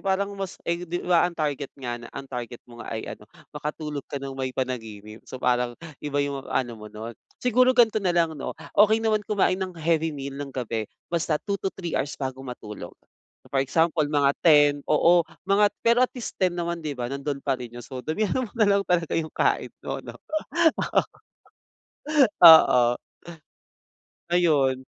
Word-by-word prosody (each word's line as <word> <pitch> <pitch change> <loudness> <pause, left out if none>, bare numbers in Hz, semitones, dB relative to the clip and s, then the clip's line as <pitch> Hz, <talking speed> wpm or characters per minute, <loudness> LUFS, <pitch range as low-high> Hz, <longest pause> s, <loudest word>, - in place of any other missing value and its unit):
parang 195 +1 0
mas, 195 -2 -5
eh, 170 +1 -1
'di 175 +1 -3
ba 175 -2 +4
ang 170 - -12
target 145 -2 -2
nga 120 -2 -4
na 120 - -10
ang 135 - -5
target 120 -2 -6
mo 120 -1 -13
nga - - -10
ay 110 - -4
ano - - -12 0.3
makatulog 150 0 -4
ka - - -3
ng 135 0 -6
may 130 -1 -3
panaginip 110 -4 -5
so - - -6
parang 125 -1 0 0.3
iba 145 -1 -3
yung 140 -1 -4
ano 120 -2 0
mo 105 - -9
nun. 110 +2 -7 0.3
Siguro 250 +1 +4
gan'to 225 -3 +4
nalang 170 -3 +1
'no - - -3 0.2
okey 215 +2 +5
naman 215 -1 +2
kumain 195 -2 +1
ng 185 -2 -4
heavy 160 0 +1
meal 140 0 -5
ng 145 - -5
gabi 115 -4 -3 0.2
basta 165 -2 +1
2 200 - -1
to - - 0
3 175 -4 -5
hours 145 - -2
bago 130 -1 -4
matulog, 105 -8 -8 0.6
for 135 - +1
example 160 +3 +2
mga 145 -2 +3
10 145 -3 +7 0.2
oo 170 0 +4 0.2
mga 205 +1 +5 0.2
pero 235 +1 +4
at - - -6
least 245 - -6
10 185 -2 +3
naman 170 0 -3
'di 150 - -2
ba 120 -1 -3
nandun 140 0 -3
pa 140 - +1
rin 120 - -6
yung 120 - -8
so 130 -2 -7
damihan 215 +9 0
mo - - -21
nalang 200 -3 +4
talaga 170 -3 +1
yung 160 -1 -2
kain - - +1 0.2
'no, - - -3 0.6
oo. 330 -2 +3 1.4
Oo, 160 -6 +9 1.5
ayun. 140 -7 +2
150 Hz, 180 wpm, -25 LUFS, 130-180 Hz, 1.5 s, Oo